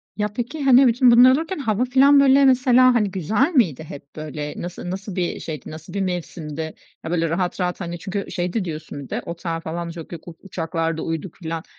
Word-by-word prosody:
Ya, 210 0 0
peki, 250 +7 -4
hani, 265 -1 +6
bütün 245 +1 +5
bunlar 245 +2 +8
olurken 320 +4 -1
hava 225 -1 0
filan, 275 +3 +5
böyle, 275 0 +5
mesela, 255 -1 +5
hani, 210 -5 +1
güzel 205 - +1
miydi 170 - +2
hep, 140 -2 -11
böyle? 150 -1 -5
Nası 175 0 -6
nasıl 195 0 -6
bir 180 -2 -2
şeydi, 155 -4 -7
nasıl 155 +3 -10
bir 200 - -2
mevsimdi? 160 -4 -4 0.3
Ya, 160 - -5
böyle, 165 -2 0
rahat 180 +3 -2
rahat, 180 +1 -2
hani, 170 -1 -5
çünkü 200 +2 -4
şeydi 180 +2 -2
diyorsun 155 -3 -6
bir - - -13
de - - -3
"Otel 170 -1 -4
falan 170 +1 -5
çok 165 -1 -9
yok, 170 -1 -9
u 170 - -9
uçaklarda 165 -3 -3
uyuduk." 165 +1 -4
filan. 165 -2 -5
180 Hz, 205 wpm, -22 LUFS, 165-245 Hz, 0.3 s, bunlar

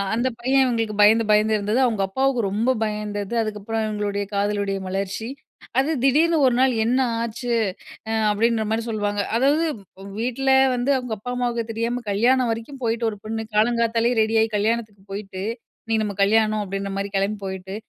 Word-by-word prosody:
அந்த 240 +3 +1
பையன் 265 +2 +3
இவுங்களுக்கு 225 -4 -1
பயந்து, 220 +2 +5
பயந்து 215 +1 +3
இருந்தது, 210 +4 0
அவுங்க 220 -5 0
அப்பாவுக்கு 265 +4 +1
ரொம்ப 220 +5 0 0.2
பயந்தது, 210 0 -4
அதுக்கப்பறம் 220 +1 -3
இவுங்களுடைய 205 -1 -2
காதலுடைய 200 -1 0
மலர்ச்சி. 195 +3 -3 0.5
அது 275 +4 +1
திடீர்னு 315 +5 +4
ஒரு 245 - +2
நாள் 260 -1 +4
என்ன 245 +3 +2 0.2
ஆச்சு? 235 +1 -4 0.6
அ - - -1 0.2
அப்பிடீன்றமாரி 220 +1 +1
சொல்லுவாங்க. 205 -2 -1 0.2
அதாவது 285 +6 +3 0.4
வ் 200 - -9
வீட்ல 255 +3 -1 0.3
வந்து 245 +2 -1
அவுங்க 250 -3 -4
அப்பா, 245 - -7
அம்மாவுக்கு 240 -2 -2
தெரியாம 235 +2 -2
கல்யாணம் 245 +4 +3
வரைக்கும் 245 +5 -8
போயிட்டு 230 0 0
ஒரு 210 - -10
பொண்ணு 220 0 -3
காலங்காத்தாலே 230 +1 +2
ரெடியாயி 220 0 +2
கல்யாணத்துக்கு 215 -2 -1
போயிட்டு, 195 -2 -6 0.4
இன்னக்கி 225 -1 +1
நம்ம 200 -1 -4
கல்யாணம் 215 +1 +2
அப்பிடீன்றமாரி 195 0 -4
கிளம்பி 200 +2 -1
போயிட்டு, 190 0 -6
220 Hz, 155 wpm, -23 LUFS, 205-240 Hz, 0.6 s, பயந்து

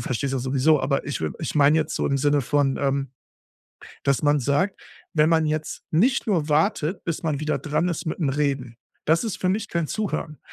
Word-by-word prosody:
verstehst 130 +3 -2
das 125 - -2
sowieso, 135 +3 +3
aber 135 +1 0
ich 140 - -3
we 80 -1 -2
ich - - -3
meine 145 +2 +5
jetzt 155 - -2
so - - 0
im 140 -1 +1
Sinne 145 +1 +2
von, 140 +1 +1
ähm, 140 -1 0 0.9
dass 140 -3 +1
man 145 -1 +3
sagt, 145 +10 0 0.3
wenn 155 0 +4
man 160 -1 +3
jetzt 155 0 -3
nicht 245 +11 +2
nur 165 -8 +1
wartet, 165 +2 +1
bis 165 -2 -3
man 155 -4 -1
wieder 155 0 -1
dran 155 +3 0
ist 170 - -3
mit'm 150 -4 -1
Reden, 135 -5 -1 0.3
das 160 +7 +2
ist 220 - -3
für 185 - 0
mich 210 +3 0
kein 170 -3 -1
Zuhören. 165 -8 -3
150 Hz, 205 wpm, -24 LUFS, 140-165 Hz, 0.9 s, meine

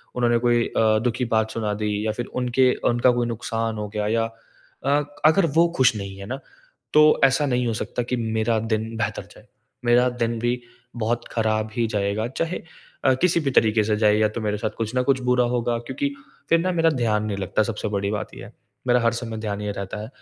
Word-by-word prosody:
उन्होंने 120 -1 +2
कोई 120 0 +2
अ, 110 -1 +2
दुःख 120 - +1
की 125 - 0
बात 110 -1 +1
सुना 105 -2 -2
दी 105 0 -2
या 110 - +1
फिर 120 +3 -4 0.2
उनके 125 +1 +3 0.2
उनका 120 +1 +4
कोई 120 -1 0
नुकसान 115 -1 -3
हो 105 0 -3
गया 105 0 -2
या 115 +1 +1 0.6
अ, 145 +1 +3 0.2
अगर 165 +4 +5
वो 170 +1 +6
खुश 125 -3 +4
नहीं 100 -2 -6
है 100 - -8
ना, 130 +6 -5 0.5
तो 150 0 +6
ऐसा 135 +2 +3
नहीं 125 -2 0
हो 115 - 0
सकता 120 +2 -3
कि 125 +1 -2
मेरा 110 0 0
दिन 110 0 -2
बेहतर 115 - -2
जाए। - - -17 0.4
मेरा 120 +1 +5
दिन 115 0 0
भी 120 +1 -1 0.3
बहुत 120 +1 -2
ख़राब 110 -1 0
ही 115 -1 +1
जाएगा, 105 +1 -1
चाहे 165 +7 -3 0.4
अ, 130 - +6
किसी 175 -2 +3
भी 140 -4 -1
तरीक़े 110 -3 +3
से 105 0 +1
जाए 105 -1 +4
या 110 - +4
तो 115 - -2
मेरे 105 -1 -1
साथ 110 +1 -2
कुछ 115 +1 -3
न 125 - +3
कुछ 130 0 +1
बुरा 125 0 +2
होगा 120 0 0
क्योंकि 285 - -3 0.4
फिर 165 - +5
ना 185 +2 0
मेरा 165 -1 +3
ध्यान 110 -6 0
नहीं 100 -2 -3
लगता 100 +3 0
सबसे 110 -1 -3
बड़ी 100 0 -1
बात 105 0 -4
ये - - -9
है, 105 - -14 0.3
मेरा 125 0 +4
हर 115 -1 +2
समय 115 -2 -5
ध्यान 105 -2 -4
ये 105 - -2
रहता 100 +1 -5
है 110 - -6
115 Hz, 225 wpm, -23 LUFS, 110-125 Hz, 0.6 s, वो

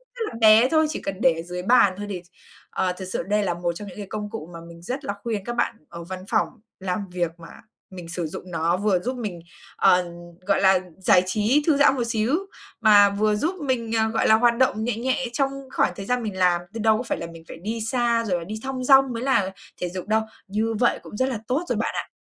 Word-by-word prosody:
rất 480 - -8
là - - -12
bé 220 +3 +7
thôi, 315 0 +3
chỉ 310 - -4
cần 195 -1 -5
để 175 - +5
ở 165 - -5
dưới 180 +1 -6
bàn 205 -3 +5
thôi 205 0 -5
thì 185 -3 -4
ch 175 - -27 0.4
ờ, 180 -1 0
thật 190 - -6
sự - - -1
đây 210 +3 +1
là 180 -3 0
một 175 0 -2
trong 205 +4 -8
những 185 - -11
cái 205 -2 -6
công 210 -1 -4
cụ 205 -7 -7
mà 170 - -8
mình 170 0 -13
rất 260 - -5
là 200 - -2
khuyên 215 -4 -3
các 240 - -4
bạn - - +1
ở 170 0 -8
văn 185 +2 -6
phòng 220 - +3 0.3
làm 190 +1 -3
việc 175 -2 -1
mà 165 - -11 0.4
mình 180 -3 -9
sử 175 -1 -3
dụng 180 +3 -9
nó, 165 +1 +1
vừa 200 -2 +2
giúp 250 +7 -4
mình, 205 -8 -5 0.4
ờ, 180 0 +4 0.4
gọi 200 - +2
là, 190 -1 +5 0.2
giải 185 -1 +4
trí, 215 +10 +2
thư 305 -3 +4
giãn 285 -1 +5
một 250 - -1
xíu, 230 +4 +1 0.5
mà 205 -2 +7
vừa 210 +1 +1
giúp 320 - -1
mình, 235 -4 -1
ờ, 220 0 +2
gọi 225 - +1
là, 220 - +7
hoạt 235 +1 +3
động 235 -4 +2
nhẹ 230 -1 -1
nhẹ 260 +2 -1
trong 270 +2 +1 0.2
khoảng - - +2
thời 195 - -7
gian 250 +2 0
mình 205 -4 -4
làm. 180 -2 +3
Chứ 230 - -5
đâu 220 0 +3
có 240 - -3
phải - - -2
là 170 - -5
mình 165 -1 -12
phải - - -9
đi 220 +6 -4
xa 235 0 +1
rồi 180 -5 0
là - - -7
đi 215 - -5
thong 265 -1 -4
dong 270 -1 +5
mới 230 +1 -4
là 200 -8 +2 0.3
thể 180 - -1
dục 185 +2 -6
đâu, 220 +1 +2 0.3
như 215 +3 -1
vậy 240 - +2
cũng 210 - -9
rất 260 +3 +1
là 245 - -2
tốt 270 +7 0
rồi - - 0
bạn - - -1
ạ. - - -3
210 Hz, 265 wpm, -24 LUFS, 180-240 Hz, 0.5 s, bé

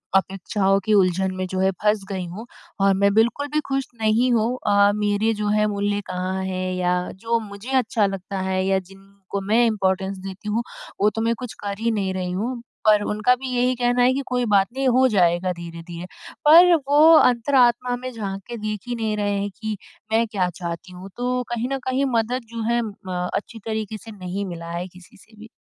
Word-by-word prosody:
अपेक्षाओं 195 +1 +1
के 215 - +2
उलझन 190 -1 +3
में 185 0 -2
जो 185 0 -3
है 190 0 +3
फँस 210 -1 +2
गई 190 -2 -3
हूँ 195 +7 -8 0.4
और 195 0 +5
मैं 200 +1 +3
बिल्कुल 235 +6 +2
भी 305 - +3
खुश 270 -1 -1
नहीं 225 +4 +3
हूँ 225 -1 +2 0.2
अ, 200 0 +5
मेरे 210 +1 +1
जो 210 -1 -3
है 210 0 +3
मूल्य 205 0 -1
कहाँ 185 +1 -3
है 185 0 -2
या 180 -1 0 0.2
जो 230 +4 -1
मुझे 210 +3 -8
अच्छा 225 -4 +1
लगता 195 0 -4
है 190 0 0
या 190 0 +2
जिनको 195 +1 -9
मैं 220 +5 +3
इम्पोर्टेंस 195 -3 0
देती 195 +2 -8
हूँ, 225 +3 0 0.4
वो 210 - +5
तो 225 - -4
मैं 230 +1 +2
कुछ 250 -3 -6
कर 200 -1 -3
ही 230 +1 +1
नहीं 195 -3 -1
रही 185 -1 -3
हूँ। 235 +7 -3 0.2
पर 210 -1 +5
उनका 210 +4 +2
भी 260 +1 -7
यही 250 +1 +2
कहना 245 0 +1
है 255 +1 +4
कि 275 - -1
कोई 250 -1 0
बात 195 -1 +5
नहीं 270 0 0
हो 260 +1 +4
जाएगा 180 -4 +2
धीरे-धीरे। 170 0 -8 0.4
पर 345 +4 +8
वो 290 +1 +4 0.2
अंतरात्मा 245 -1 +3
में 255 +1 -6
झाँक 200 -4 -5
के 240 -1 -6
देख 215 -1 -3
ही 245 - -2
नहीं 220 -2 -1
रहे 205 -1 0
हैं 200 +1 -2
कि 215 -1 -3 0.3
मैं 225 +1 +3
क्या 190 -4 -1
चाहती 170 0 -6
हूँ 185 +2 -10
तो 250 +1 -1
कहीं 240 +1 -2
न - - 0
कहीं 260 +2 +1
मदद 235 +3 0
जो 230 - -4
है 240 - +2
अ, 185 -5 -4
अच्छी 225 +2 -4
तरीके 220 -1 -3
से 225 +3 -12
नहीं 195 0 -5
मिला 170 -2 -7
है 175 +2 -4
किसी 180 +5 -17
से 220 +3 -20
भी। 220 +1 -12
210 Hz, 210 wpm, -23 LUFS, 190-235 Hz, 0.4 s, पर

